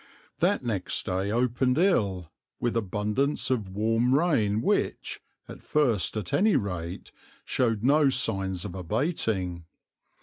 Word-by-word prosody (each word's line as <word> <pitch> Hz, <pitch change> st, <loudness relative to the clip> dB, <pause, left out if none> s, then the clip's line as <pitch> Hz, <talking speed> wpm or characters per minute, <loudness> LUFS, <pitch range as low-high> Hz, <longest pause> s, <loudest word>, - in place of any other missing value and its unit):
That 180 Hz, -2 st, +2 dB
next 105 Hz, -6 st, -1 dB
day 95 Hz, +2 st, -1 dB
opened 125 Hz, +3 st, +1 dB
ill, 100 Hz, -, +1 dB, 0.3 s
with 120 Hz, -1 st, -1 dB
abundance 105 Hz, +7 st, -1 dB
of 110 Hz, -7 st, -1 dB
warm 115 Hz, +6 st, +1 dB
rain 115 Hz, -11 st, +1 dB
which, -, -, -1 dB, 0.3 s
at -, -, -10 dB
first 120 Hz, -9 st, +1 dB
at 105 Hz, -4 st, -4 dB
any 215 Hz, +2 st, +3 dB
rate, 90 Hz, -4 st, -3 dB, 0.3 s
showed 115 Hz, -4 st, 0 dB
no 145 Hz, +2 st, +4 dB
signs 95 Hz, -8 st, 0 dB
of -, -, -6 dB
abating. 95 Hz, -, -2 dB
110 Hz, 125 wpm, -27 LUFS, 95-130 Hz, 0.3 s, no